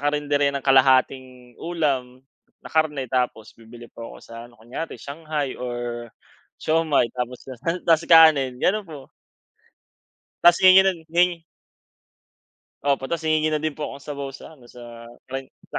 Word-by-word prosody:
karinderya 145 -1 +1
ng 140 -1 -5
kalahating 130 -2 +2
ulam 135 -7 -2 0.4
na - - -8
karne 150 -4 0
tapos 125 -4 -2
bibili 115 +1 -14
po 115 - -10
ako - - -12
sa 115 - -13
ano, 120 - -22
kunyare 125 +8 -7
shanghai 150 -2 -5
or 120 -1 -5 0.5
siomai 155 -5 +1
tapos 125 0 -4
sa 130 - -9 0.3
tas 165 -1 +3
kanin, 155 -6 +6
gano'n 210 +9 +1
po. 140 -4 -11 1.4
Tas 175 0 +7
hihingi 185 0 +8
no'n 165 -4 -4 0.2
hi 170 -1 -10 1.4
Opo. 140 -2 0
Tas 170 +2 -3
hihingi 155 -1 +1
na 150 - -2
din 155 -2 -3
po 150 - -3
akong 140 +1 -10
sabaw 140 -2 -6
sa 155 - -13
ano, 120 - -18
sa 120 -1 -12 0.2
karin 135 0 -5 0.2
sa - - -3
140 Hz, 150 wpm, -23 LUFS, 125-155 Hz, 1.4 s, hihingi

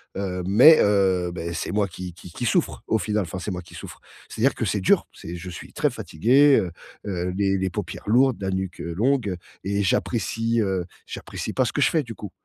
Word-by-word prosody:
Hem, 90 -2 -3
mais 130 +11 +8
heu, 95 -3 +2
beh, 85 -1 -4
c'est - - -3
moi 105 -1 +1
qui 90 0 -7
qui 90 0 -13
qui 120 - -4
souffre, - - 0
au 110 - +2
final- 105 +1 -1
enfin, 90 +2 -6
c'est 100 - -4
moi 90 -1 -4
qui 85 - -15
souffre- - - -9 0.3
c'est-à-dire 125 +5 +1
que - - -3
c'est 105 +1 0
dur, 95 - +3
c'est 85 +2 -8
je 90 +2 -7
suis 90 - -10
très - - +1
fatigué, 135 - +3
heu 90 -2 -3 0.4
heu, 90 0 -2
les 95 -1 +1
les 95 0 -1
paupières - - -6
lourdes, 125 +3 +4
la 95 - -2
nuque 95 -2 -3
longue 105 +3 0 0.3
et 100 +1 0
j'apprécie, 115 +3 0
heu, 95 -4 -1 0.2
j'apprécie - - -6
pas - - +1
ce - - -3
que - - -1
je - - +5
fais, 160 -2 +1
du 115 -3 -9
coup. 105 - -8
95 Hz, 220 wpm, -24 LUFS, 90-115 Hz, 0.4 s, mais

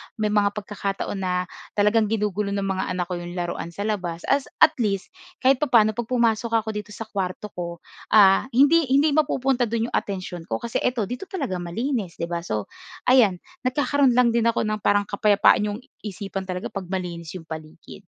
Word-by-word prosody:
may 215 -1 -1
mga 205 0 +2
pagkakataon 200 -1 -4
na 180 -1 0 0.3
talagang 210 +1 +3
ginugulo 210 -1 -1
ng 200 - -1
mga 190 -1 -1
anak 180 - 0
ko 175 - -2
'yong 175 0 -7
laruan 175 -1 -3
sa 170 +4 -6
labas 180 -6 -3
as 275 -1 +2 0.2
at 315 - +8
least, 200 - -1 0.3
kahit 265 0 +5
papa'no 235 -7 +4
'pag 225 +1 -4
pumasok 230 -2 +1
ako 220 -1 +1
dito 210 0 -7
sa 225 - -5
kuwarto 200 -1 -4
ko, 170 -1 -6 0.3
ah 195 +2 +6
hindi 290 +3 +5
hindi 280 +3 +4
mapupunta 270 -4 +1
do'n 230 +1 -2
'yong - - +2
atensyon 185 -4 -6
ko, - - -1
kasi 235 -1 -2
ito 245 -4 0
dito 250 - -5
talaga 265 - -3
malinis, 200 - -3
'di 170 +1 -5
ba? 170 - -1
So 110 - -4 0.3
ayan, 245 -7 +5 0.3
nagkakaroon 270 -1 +2
lang 250 -1 +4
din 230 0 +2
ako 230 0 +1
ng 215 0 -1
parang 205 0 +2
kapayapaan 205 +1 +3
'yong 205 +1 -4 0.2
isipan 195 -2 -6
talaga 180 0 -4
'pag 195 -3 -6
malinis 175 -3 -5
'yong 180 - -7
paligid. 160 +4 -10
210 Hz, 190 wpm, -24 LUFS, 185-235 Hz, 0.3 s, at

